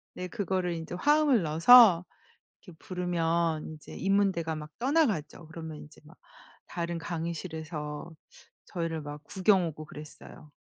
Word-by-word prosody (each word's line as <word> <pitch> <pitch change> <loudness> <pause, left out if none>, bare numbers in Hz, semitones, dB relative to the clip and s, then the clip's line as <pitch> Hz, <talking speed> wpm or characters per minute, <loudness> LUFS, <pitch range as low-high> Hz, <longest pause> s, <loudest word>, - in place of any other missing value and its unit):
네 180 - -5
그거를 185 -4 -2
인제 165 +1 -6
화음을 295 +1 +3
넣어서 175 +4 +7 0.6
이렇게 170 -3 -14
부르면 170 -3 -1
인제 155 -1 -11
인문대가 190 -4 +1
막 150 0 -8
떠나가죠. 235 - 0
그러면 160 -1 -8
인제 150 0 -14
막 160 +4 -17 0.5
다른 170 0 -4
강의실에서 160 -2 -5 0.5
저희를 165 -3 -4
막 145 0 -8
구경 190 -2 +2
오고 155 0 -7
그랬어요. 150 +1 -12
170 Hz, 305 characters per minute, -29 LUFS, 155-185 Hz, 0.6 s, 넣어서